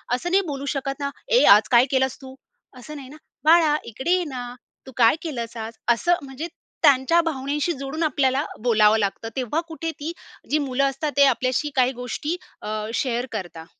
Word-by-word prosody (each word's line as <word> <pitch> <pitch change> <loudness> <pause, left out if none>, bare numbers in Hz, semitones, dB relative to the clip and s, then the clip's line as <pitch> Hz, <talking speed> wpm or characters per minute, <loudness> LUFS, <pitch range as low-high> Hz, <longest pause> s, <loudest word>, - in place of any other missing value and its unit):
असं 345 +8 -4
नाही 390 +2 +4
बोलू 280 -2 -4
शकत 275 0 -3
ना, 280 -1 -2 0.2
"ए - - +4
आज 215 +1 +2
काय 240 0 +6
केलंस 265 -1 +1
तू?" 265 0 -11 0.4
असं 300 +5 -10
नाही 270 -3 -9
ना. 300 - -12 0.3
"बाळा 315 -1 +5
इकडे 265 +9 -3
ये 365 0 +3
ना, 245 -3 -6 0.3
तू 265 - -10
काय 230 +2 +5
केलंस 240 -9 -5
आज?" 225 0 -6 0.2
असं 345 +10 +3
म्हणजे 270 +5 -6 0.4
त्यांच्या 285 +2 +5
भावनेशी 290 +2 -1
जोडून 275 +3 -4
आपल्याला 275 -3 +1 0.2
बोलावं 220 -2 +4
लागतं. 205 +2 -2
तेव्हा 265 +5 -1
कुठे 325 0 -4
ती 305 +3 -4 0.4
जी 300 - +2
मुलं 260 +1 0
असतात 280 +3 -3
ते 285 - +7
आपल्याशी 260 +2 +1
काही 255 -1 +3
गोष्टी 250 +6 -4 0.3
अ, 215 0 -4
शेअर 245 -1 -1
करता. 175 -6 -6
265 Hz, 185 wpm, -23 LUFS, 245-300 Hz, 0.4 s, ते